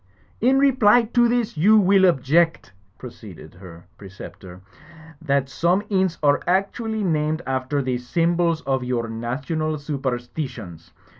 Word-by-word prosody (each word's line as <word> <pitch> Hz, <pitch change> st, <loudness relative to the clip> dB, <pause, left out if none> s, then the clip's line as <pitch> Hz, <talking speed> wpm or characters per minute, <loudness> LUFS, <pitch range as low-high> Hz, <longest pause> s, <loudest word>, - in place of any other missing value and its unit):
"In 260 Hz, +4 st, +3 dB
reply 245 Hz, -4 st, +4 dB
to 240 Hz, +1 st, +2 dB
this 240 Hz, -5 st, -1 dB
you 210 Hz, +8 st, +5 dB
will 195 Hz, -1 st, +4 dB
object 165 Hz, -, +1 dB, 0.2 s
^" -, -, -39 dB
proceeded 105 Hz, -10 st, -12 dB
her 90 Hz, -2 st, -14 dB
preceptor, 95 Hz, -2 st, -12 dB, 0.6 s
"that 140 Hz, -3 st, 0 dB
some 175 Hz, +8 st, 0 dB
inns 190 Hz, -4 st, 0 dB
are 145 Hz, -1 st, +3 dB
actually 210 Hz, +4 st, -1 dB
named 155 Hz, -2 st, -1 dB
after 135 Hz, +2 st, -2 dB
the 125 Hz, -1 st, -2 dB
symbols 165 Hz, +5 st, 0 dB
of 135 Hz, -3 st, -2 dB
your 125 Hz, -2 st, -2 dB
national 150 Hz, +8 st, -3 dB
superstitions. 125 Hz, -, -6 dB
150 Hz, 130 wpm, -22 LUFS, 125-190 Hz, 0.6 s, you